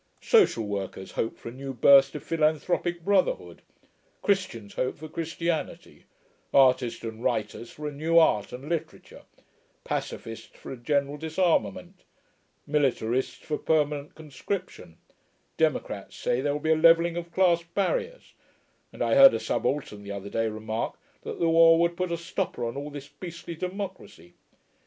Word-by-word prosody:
Social 405 - +4
workers 100 -2 -5
hope 115 - -2
for - - -8
a - - -9
new 135 +1 -7
burst 135 +4 +6
of 150 - -6
philanthropic 165 +2 0
brotherhood; 205 - +1 0.6
Christians 185 - -1
hope 130 - -2
for 155 - -8
Christianity; 165 +1 -4 0.5
artists 130 -3 +3
and 115 0 -6
writers 110 +1 -2
for 150 0 -7
a - - -3
new 160 +4 +1
art 105 -11 +4
and 130 +4 -8
literature; 165 -1 -5 0.6
pacificists 115 0 -5
for - - -10
a 130 - -6
general 140 +3 -1
disarmament; 160 - -1 0.6
militarists 130 -4 0
for 150 - -2
permanent 150 -2 0
conscription; 155 - -6 0.6
democrats - - -1
say 120 - -1
there 145 +1 0
will 145 - -2
be 160 +2 0
a - - +5
levelling 165 +1 +5
of 170 -1 -5
class 175 -2 +3
barriers; 460 - -3 0.6
and - - -3
I - - +1
heard 275 -1 +9
a - - -1
subaltern 130 -8 -2
the 100 0 -7
other 100 0 -6
day 115 0 0
remark 110 +1 -4 0.2
that - - -7
the 170 - +2
war 165 0 +6
would 170 0 +2
'put 185 0 -2
a 170 - -1
stopper 160 -7 -3
on 115 - -4
all 145 +1 -5
this 140 -1 -8
beastly 170 +3 -8
democracy.' 180 - -7
150 Hz, 150 wpm, -27 LUFS, 120-170 Hz, 0.6 s, heard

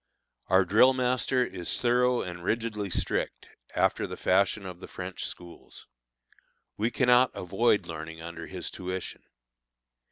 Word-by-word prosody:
Our 95 +1 +4
drill 125 +7 +6
master 125 0 +1
is 90 -6 -3
thorough 125 0 +2
and 85 -1 -7
rigidly 110 -1 -1
strict, - - -2 0.3
after - - +2
the - - -7
fashion 100 +2 +2
of 90 -2 -8
the - - -9
French 90 0 -5
schools. 85 -1 -10 0.9
We 110 +3 0
cannot 125 0 +4
avoid 105 +4 +1
learning 80 0 -7
under 85 0 -7
his 95 -2 -5
tuition. 95 0 -5
95 Hz, 130 wpm, -28 LUFS, 90-120 Hz, 0.9 s, drill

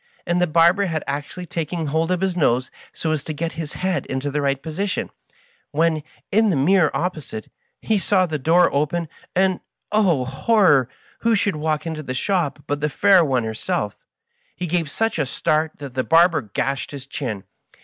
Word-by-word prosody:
and 175 +1 +1
the 180 - +3
barber 170 +5 +4
had 160 -3 -2
actually 145 +6 -4
taken 165 0 -3
hold 160 +3 0
of 185 -1 0
his 190 -2 0
nose 130 -6 +1 0.2
so 160 - -2
as 155 -3 -1
to 155 - -4
get 165 +2 -2
his 160 -2 -6
head 185 0 -1
into 135 +2 -2
the 145 +1 -1
right 140 -1 0
po 160 - -5
sition, 195 +4 -2 0.6
when, 160 +1 +1 0.3
in 220 +2 +4
the 180 - +2
mirror 160 +4 +4
opposite, 155 -11 -4 0.3
he 220 -2 +2
saw 190 -1 +2
the 155 -3 -3
door 170 +5 +4
open, 155 +4 0 0.3
and— 185 0 +2 0.3
oh, 185 -11 +3
horror! 140 - +3 0.2
— - - -30
^who 230 -1 +4
should 200 -3 0
walk 155 0 -1
into 160 -2 -4
the 130 -3 -5
shop 160 -2 -1
but 145 0 -2
the 150 - +1
fair 190 +4 +5
one 130 -5 +1
herself 110 -2 -2
I - - -46 0.5
He 180 - -4
gave 170 -2 -1
such 225 +2 -1
a 150 - +2
start 155 +4 0
that 140 -3 -8
the 130 0 0
barber 165 +1 +4
gashed 135 +5 -2
his 140 -2 -8
chin. 130 - -4
160 Hz, 195 wpm, -22 LUFS, 140-180 Hz, 0.6 s, fair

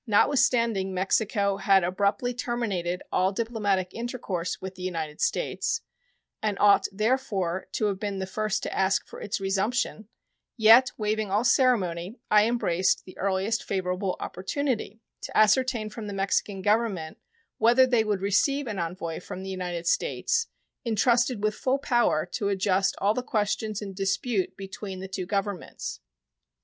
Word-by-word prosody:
Notwithstanding 225 -4 +2
Mexico 200 +1 +1
had 195 -1 +4
abruptly 200 +7 0
terminated 205 -8 -2
all 185 +1 +2
diplomatic 205 -4 -1
intercourse 225 -7 -3
with 190 0 -6
the 185 - -12
United 165 -4 -4
States, 455 0 0 0.6
and 210 -2 -1
ought, 205 -1 +5
therefore, 200 -5 -1
to 215 - 0
have 200 -2 -1
been 205 -2 -3
the 190 - -2
first 215 +2 -2
to - - -3
ask 195 0 +2
for - - -11
its 205 - -3
resumption, 200 +3 -1 0.5
yet, 230 +3 +7
waiving 215 -1 -1
all 205 +4 +1
ceremony, 220 -6 +2
I 210 0 +6
embraced 185 -7 +1
the 185 - -12
earliest 195 +3 0
favorable 185 0 -2
opportunity 225 +1 -3 0.2
"to - - -4
ascertain 215 0 +3
from 215 -1 -7
the 205 - -5
Mexican 195 0 -1
Government 205 -7 0 0.4
whether 240 +3 +6
they 245 -3 +3
would 205 -3 -1
receive 275 +9 +2
an 210 -5 -4
envoy 170 -1 -4
from 185 +1 -8
the 190 - -5
United 175 -2 -4
States 465 - +1 0.4
intrusted 235 0 +2
with 215 0 +2
full 260 +5 0
power 240 - +2
to 200 +3 -2
adjust 195 0 +1
all 205 +2 +2
the 250 - -2
questions 215 -2 -1
in 195 -1 -6
dispute 195 0 -1
between 195 0 -7
the 190 - -6
two 190 -1 -5
Governments." 200 -2 -3
205 Hz, 150 wpm, -27 LUFS, 190-230 Hz, 0.6 s, yet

